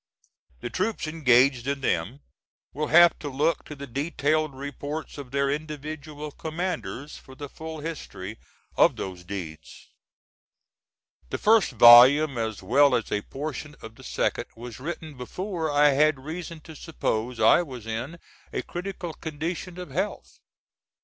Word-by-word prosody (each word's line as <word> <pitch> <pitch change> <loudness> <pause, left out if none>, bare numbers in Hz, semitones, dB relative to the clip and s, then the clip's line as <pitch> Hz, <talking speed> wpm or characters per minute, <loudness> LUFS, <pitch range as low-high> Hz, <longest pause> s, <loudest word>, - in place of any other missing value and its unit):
The 120 - -5
troops 215 +1 -1
engaged 135 -4 +3
in 140 0 -1
them 110 - -1 0.5
will 150 +2 -2
have 175 +2 +6
to 145 - -5
look 150 +4 0
to 150 - -8
the 140 0 -7
detailed 145 +2 -1
reports 145 +3 -6
of 140 -3 -8
their 140 +1 +1
individual 150 0 -6
commanders 160 -3 -4
for 130 - -15
the 145 +1 -7
full 160 +2 -8
history 115 - -7 0.4
of - - +5
those 90 -2 -6
deeds. 85 -5 -8 1.4
The - - -2
first 215 - +4
volume, 125 +5 +8
as 110 -3 -3
well 135 +6 +4
as 115 - -2
a 105 - 0
portion 150 +4 -6
of 110 0 -9
the - - -16
second, - - -1
was 115 -1 -9
written 155 0 -6
before 170 - -4
I 145 0 +5
had 150 +1 +3
reason 165 0 -6
to 160 +1 -12
suppose 125 -7 -3
I 110 +9 +6
was 130 -9 -8
in 120 +9 -4 0.3
a - - -3
critical 175 -2 -6
condition 165 +3 -5
of 180 -1 -8
health. 210 - -4
145 Hz, 145 wpm, -26 LUFS, 125-160 Hz, 1.4 s, volume